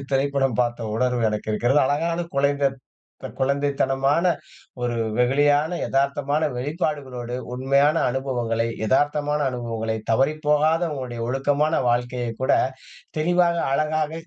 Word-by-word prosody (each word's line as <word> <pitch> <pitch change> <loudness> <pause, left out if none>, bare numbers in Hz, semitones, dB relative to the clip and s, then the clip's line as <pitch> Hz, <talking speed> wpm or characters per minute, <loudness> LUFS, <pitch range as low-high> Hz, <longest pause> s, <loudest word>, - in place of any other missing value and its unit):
ஒரு 140 - -9
திரைப்படம் 135 -2 +1
பார்த்த 120 -2 -1
உணர்வு 125 0 0
எனக்கு 105 0 -4
இருக்கிறது. 120 +6 +2
அழகான 165 +4 0
குழந்தத் 140 -1 +1 0.6
குழந்தைத்தனமான 140 +2 +1 0.6
ஒரு 120 -1 -1 0.2
வெகுளியான 145 +6 +2
எதார்த்தமான 140 +2 0
வெளிப்பாடுகளோடு, 135 -4 -3 0.2
உண்மையான 140 +4 +3 0.2
அனுபவங்களை 120 -3 -1 0.2
எதார்த்தமான 145 +3 +1
அனுபவங்களை, 115 -2 -3
தவறி 135 +7 +3
போகாத 155 +3 +3
உங்களுடைய 125 -4 -5
ஒழுக்கமான 145 +4 +1
வாழ்க்கையை 120 0 -1
கூட, - - +2 0.7
தெளிவாக 175 +1 +2 0.2
அழகாக, 155 +1 0
135 Hz, 105 wpm, -23 LUFS, 125-150 Hz, 0.7 s, உண்மையான